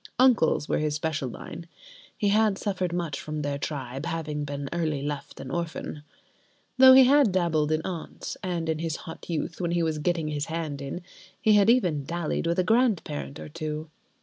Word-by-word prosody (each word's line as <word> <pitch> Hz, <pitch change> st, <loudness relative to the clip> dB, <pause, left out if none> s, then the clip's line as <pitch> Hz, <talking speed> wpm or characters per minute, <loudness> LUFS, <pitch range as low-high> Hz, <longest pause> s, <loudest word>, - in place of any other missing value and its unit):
Uncles 245 Hz, -, +4 dB
were -, -, +1 dB
his 150 Hz, -1 st, 0 dB
special 150 Hz, -3 st, -2 dB
line—(he 170 Hz, -, -7 dB
had 210 Hz, -1 st, +3 dB
suffered 185 Hz, -4 st, -2 dB
much 170 Hz, -5 st, -2 dB
from 155 Hz, 0 st, -4 dB
their 140 Hz, -1 st, -2 dB
tribe, 135 Hz, 0 st, -4 dB
having 155 Hz, -3 st, -3 dB
been 140 Hz, -1 st, -4 dB
early 155 Hz, -5 st, -1 dB
left 145 Hz, -1 st, -5 dB
an 135 Hz, -1 st, -7 dB
orphan)—though 170 Hz, -, +1 dB
he 265 Hz, 0 st, +9 dB
had 270 Hz, -3 st, +5 dB
dabbled 165 Hz, -4 st, +1 dB
in 155 Hz, 0 st, +1 dB
aunts, 175 Hz, -4 st, -5 dB
and 175 Hz, -3 st, -2 dB
in 160 Hz, -1 st, 0 dB
his 165 Hz, -1 st, -2 dB
hot 165 Hz, 0 st, -9 dB
youth, 165 Hz, +1 st, -3 dB
when 175 Hz, -, 0 dB
he 170 Hz, -1 st, +2 dB
was 160 Hz, -2 st, -1 dB
getting 165 Hz, -1 st, 0 dB
his 145 Hz, 0 st, -2 dB
hand 160 Hz, -4 st, -4 dB
in, 140 Hz, +6 st, -5 dB, 0.4 s
he 215 Hz, -, +4 dB
had 205 Hz, +1 st, +5 dB
even 180 Hz, -, +3 dB
dallied 170 Hz, +1 st, -2 dB
with 170 Hz, -, +1 dB
a 185 Hz, -, +3 dB
grand 225 Hz, -1 st, +3 dB
parent 145 Hz, -1 st, -6 dB
or -, -, -7 dB
two. 155 Hz, 0 st, -5 dB
160 Hz, 185 wpm, -27 LUFS, 150-180 Hz, 0.4 s, he